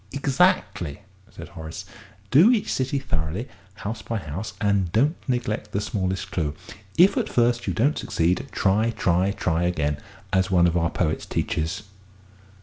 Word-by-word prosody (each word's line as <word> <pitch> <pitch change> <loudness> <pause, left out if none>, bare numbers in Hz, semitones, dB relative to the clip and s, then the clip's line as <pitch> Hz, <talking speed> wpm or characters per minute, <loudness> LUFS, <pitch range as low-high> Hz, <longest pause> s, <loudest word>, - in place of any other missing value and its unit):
'" - - -30
"Exactly," 140 - +1 0.3
said - - -10
Horace. 80 -3 -8 0.5
"Do 160 - +7
each 230 -5 +1
city 130 +2 0
thoroughly, 95 - -2 0.3
house 110 +1 -5
by 115 - -3
house, 95 +3 -5
and 100 -4 +1
don't 140 - +3
neglect 110 -4 -2
the 100 - +1
smallest 95 -3 -2
clue. 75 -4 -1 0.4
'If 180 +4 +6
at - - 0
first 120 0 +2
you - - -1
don't 140 +7 +2
succeed, 90 +11 0
try, 105 +4 +2
try, 95 -4 +1
try, 85 -5 0
again!' 75 -5 0 0.4
as 95 0 +2
one 90 -2 +4
of 85 -1 +2
our 85 -1 +2
own - - +1
poets 80 -3 -1
teaches." 80 +7 -2
100 Hz, 160 wpm, -24 LUFS, 85-120 Hz, 0.5 s, Do